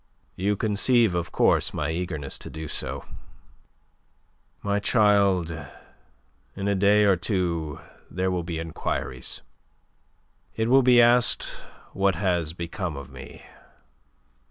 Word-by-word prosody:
"You 100 +3 0
conceive, 110 +1 +2
of 85 -1 -2
course, - - +2
my 75 +1 -1
eagerness 80 -5 -4
to - - -8
do 80 0 -7
so. - - -2 1.6
My 100 0 0
child, 100 -6 +3 1.0
in 100 +1 -3
a 100 - +2
day 100 +2 +4
or 100 -2 +5
two 85 -5 -2 0.3
there 95 +1 -1
will 90 -1 -1
be 85 -1 -5
enquiries. 80 -5 -4 1.1
It 110 +1 0
will 135 +2 +6
be 125 -1 +5
asked 120 +1 +4 0.5
what 95 -1 +1
has 85 -3 0
become 85 -2 -5
of 70 -1 -9
me. 65 - -11
95 Hz, 120 wpm, -25 LUFS, 80-105 Hz, 1.6 s, will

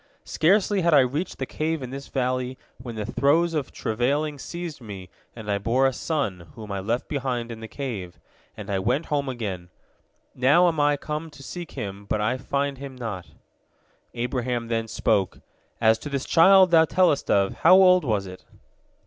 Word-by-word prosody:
Scarcely 195 +4 +2
had 170 -2 +4
I 140 - +7
reached 145 +8 -2
the 130 - -3
cave 155 +1 -2
in 125 - -6
this 135 +1 -7
valley 130 -1 -2 0.2
when 120 -2 -8
the 105 -1 -4
throes 155 +8 +2
of 150 -4 -2
travailing 140 +6 -1
seized 170 0 -7
me, 95 -5 -9 0.2
and 110 -2 -9
I 100 -1 0
bore 120 +6 +2
a 135 - +2
son, 110 - -3
whom 105 -2 -9
I 100 - -2
left 115 +6 -2
behind 125 -4 -3
in 115 - -8
the 110 - -8
cave, 110 -10 -6 0.4
and 105 0 -7
I 95 - 0
went 135 - 0
home 140 -2 0
again. 100 -8 -5 0.6
Now 145 +8 +4
am 165 -3 0
I 145 0 +3
come 155 +2 -5
to 145 -2 -14
seek 175 +3 -8
him, 100 -5 -6
but 105 - -1
I 120 +5 0
find 140 0 -2
him 135 -1 -8
not." 105 -9 -6 0.9
Abraham 120 -1 -2
then 115 -1 -1
spoke, 105 -3 0 0.4
"As 110 -1 +4
to 145 - -7
this 140 -1 -3
child 190 +2 +6
thou 160 -1 +6
tellest 175 -4 +2
of, 100 -1 +2
how 185 - +7
old 185 -1 +6
was 105 -7 0
it?" 95 -1 -10
130 Hz, 185 wpm, -24 LUFS, 110-150 Hz, 0.9 s, I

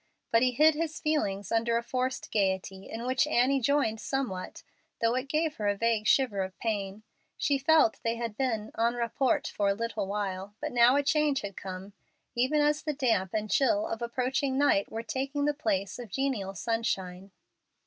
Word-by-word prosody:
But 230 - +4
he 255 - +4
hid 310 +5 +5
his 310 0 -3
feelings 205 -11 -1
under 230 +1 +2
a 235 - -2
forced 255 +1 -3
gayety, 190 -1 -1
in 230 +2 -5
which 255 +3 +2
Annie 270 0 +3
joined 240 -4 +1
somewhat, 245 -10 -4 0.4
though 230 0 +2
it 255 +2 -2
gave 310 +1 0
her 210 - -1
a 205 - +2
vague 225 -1 +1
shiver 240 -8 +3
of 190 0 -5
pain. 205 -2 -3 0.3
She 280 -1 +1
felt 290 -4 +4
they 230 0 0
had 230 -2 -4
been 225 -5 -2
en 235 +1 +2
rapport 240 +2 +1
for 205 -1 +1
a 200 - +1
little 230 -2 -3
while, 200 0 -4
but - - -3
now 245 +1 +5
a 285 - +2
change 295 -1 +2
had 200 -2 -6
come, 190 +1 -7 0.4
even 260 +5 +2
as 295 +1 +2
the 305 - -2
damp 225 - 0
and 215 -1 -2
chill 305 +3 +3
of 225 -6 -4
approaching 260 +3 -1
night 280 -8 +2
were 225 +1 -4
taking 275 +4 -2
the 295 - +2
place 200 -7 -2
of 240 -3 -8
genial 210 -5 -2
sunshine. 190 -2 -2
235 Hz, 190 wpm, -29 LUFS, 205-275 Hz, 0.4 s, hid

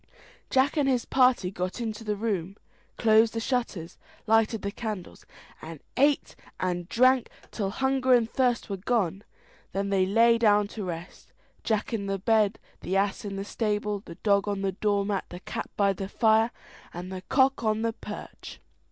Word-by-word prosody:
Jack 270 +4 +2
and 280 -2 +3
his 250 -3 +1
party 250 -8 +3
got 185 +3 -4
into 225 -1 -4
the 210 -1 -1
room, 200 -3 -3 0.4
closed 220 0 +4
the - - 0
shutters, 225 -9 -3 0.3
lighted 225 -1 +2
the 200 - -2
candles, 210 -5 -6 0.3
and 160 -1 -8 0.2
ate 285 +2 +2 0.2
and 175 -1 -2
drank 255 +1 +3 0.2
till 200 -3 -2
hunger 265 +3 0
and 235 -2 +2
thirst 245 0 0
were 195 - -4
gone. 195 -2 -1 0.5
Then 200 +1 -1
they 190 -1 +2
lay 230 +3 +4
down 210 -2 +4
to 215 - -6
rest; 175 -1 -8 0.3
Jack 220 0 -1
in 200 -3 -2
the 195 0 -1
bed, 215 +1 +2 0.2
the 190 - -1
ass 195 0 0
in 200 -1 -4
the 195 0 -4
stable, 210 -1 -1
the 170 - -10
dog 200 +2 +1
on 200 -1 -2
the 195 - +1
door 200 +1 0
mat, 200 -2 -2
the 175 - -8
cat - - -6
by 200 -1 +3
the 195 +1 -6
fire, 220 +1 +3 0.4
and 180 +2 -7
the 185 -1 -5
cock 265 -2 +3
on 215 0 +1
the 230 0 0
perch. - - -9
210 Hz, 180 wpm, -27 LUFS, 195-230 Hz, 0.5 s, closed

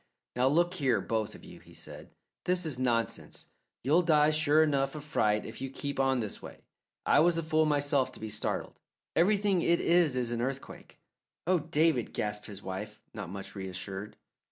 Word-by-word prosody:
"Now, 125 +1 +3
look 175 +5 +3
here, 135 - +2
both 110 +1 -2
of - - -13
you," - - -12
he - - -17
said. - - -10 0.4
"This 180 -1 +1
is 150 -5 -3
nonsense. 120 -3 -1 0.4
You'll 150 +8 +4
die 155 -3 +4
sure 155 0 +4
enough 140 -2 +1
of 150 - -6
fright 105 -9 +1
if - - -8
you 135 - -3
keep 140 +1 -5
on 135 -2 +2
this 105 -2 -5
way. - - -11 0.4
I - - +5
was 170 +1 +4
a 165 - 0
fool 155 0 +2
myself 145 -2 +2
to - - -11
be 110 - -5
startled. 110 - -3 0.4
Everything 200 0 +3
it 170 +1 +3
is 170 -5 +3
is 125 -2 0
an 120 -1 -1
earthquake." 135 +2 -5 0.5
"Oh, 180 +1 +3
David!" 155 -4 +1
gasped 105 0 -3
his 100 -1 -8
wife, 105 +3 -6
not 105 -5 -6
much 95 +1 -7
reassured. 95 +1 -5
135 Hz, 185 wpm, -30 LUFS, 110-160 Hz, 0.5 s, I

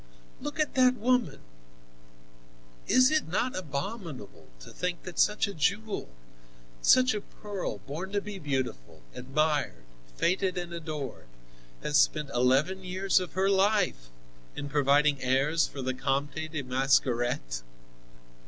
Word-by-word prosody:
"Look 295 +2 -5
at 305 - +1
that 255 -1 +4
woman! 240 - +1 1.5
Is 255 +2 +5
it 310 0 +1
not 235 +9 -1
abominable 155 - -6
to - - -11
think 180 -1 -3
that 185 - -7
such 210 0 +3
a 200 - -5
jewel, 200 - -1 0.7
such 255 - +5
a 210 - -3
pearl, 205 -2 -6
born 165 +8 -7
to 205 - +2
be 200 -1 -7
beautiful, 130 - -4
admired, 140 - -1 0.3
feted 185 +1 +1
and 175 -1 -4
adored, 150 - -6 0.6
has 150 -1 +2
spent 150 -3 +2
eleven 135 +10 +2
years 190 +1 +1
of 180 -2 -6
her 190 +1 +1
life 195 - +2 0.5
in 145 - -5
providing 145 0 +3
heirs 135 +5 +2
for 135 - -7
the 130 0 -1
Comte 140 +2 -1 0.2
de 155 -3 -3
Mascaret?" 125 - +1
155 Hz, 130 wpm, -29 LUFS, 135-195 Hz, 1.5 s, Is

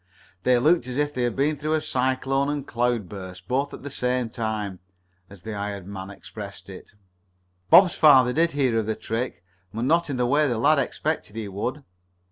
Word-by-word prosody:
They 125 +5 +3
looked 150 +1 +3
as 125 0 -4
if 145 0 0
they 125 - -2
had 120 -2 0
been 145 +3 +1
through 155 +2 -1
a - - +2
cyclone 135 0 0
and 145 -2 -3
cloud 120 -4 -1
burst, 95 -1 -9
both 140 +3 0
at - - -10
the 140 - -6
same 125 -2 -1
time, 110 -5 -3 0.5
as 95 -3 -14
the 110 - -5
hired 100 -2 -4
man 95 0 -7
expressed 100 0 -10
it. 95 - -12 0.8
Bob's 180 -2 +8
father 130 -5 +6
did 165 +2 +2
hear 130 -5 +1
of 110 - -3
the 110 - -1
trick, 115 -2 -4 0.3
but 115 +2 -4
not 165 +3 +2
in 135 - -2
the 125 - +1
way 145 +4 +3
the 120 -4 -1
lad 145 +6 +4
expected 140 -3 -2
he 110 -2 -4
would. 125 +9 -4
125 Hz, 200 wpm, -24 LUFS, 105-145 Hz, 0.8 s, Bob's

